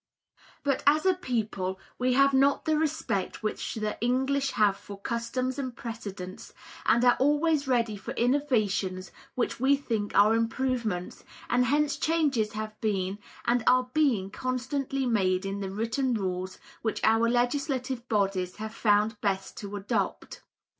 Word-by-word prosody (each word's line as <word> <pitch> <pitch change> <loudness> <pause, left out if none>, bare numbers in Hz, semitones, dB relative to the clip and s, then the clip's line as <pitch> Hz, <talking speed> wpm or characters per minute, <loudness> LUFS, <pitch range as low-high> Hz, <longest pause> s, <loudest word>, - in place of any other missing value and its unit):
But 280 -2 +1
as 305 +4 +5
a 375 - +5
people 215 - -2 0.2
we 250 0 +2
have 275 +1 +4
not 275 +1 +3
the 315 -1 +2
respect 310 - -1
which 215 - -3
the 215 -1 -3
English 265 +3 +1
have 205 -3 +3
for 200 0 -10
customs 255 +4 -2
and 255 -3 -4
precedents, 200 -5 -7 0.3
and 235 +1 +4
are 245 - +6
always 295 +1 +2
ready 235 -4 +1
for 195 - -9
innovations 215 -8 0 0.2
which 245 - -1
we 270 +3 +4
think 225 -7 -3
are 210 +2 +6
improvements, 230 -5 -1 0.3
and 250 +1 +3
hence 295 +2 +1
changes 285 -10 +1
have 215 0 -6
been 195 -2 -1 0.3
and 240 0 +2
are 255 0 +4
being 240 -11 +2
constantly 260 +2 -2
made 190 -5 +1
in 195 +1 -3
the 195 -1 -3
written 230 +5 -1
rules 185 -2 -3 0.2
which 220 - -1
our 225 +1 +4
legislative 255 0 -1
bodies 195 -4 0
have 220 +1 -6
found 210 0 +2
best 195 -2 -1
to 205 0 -6
adopt. 200 0 -3
235 Hz, 145 wpm, -28 LUFS, 205-265 Hz, 0.3 s, are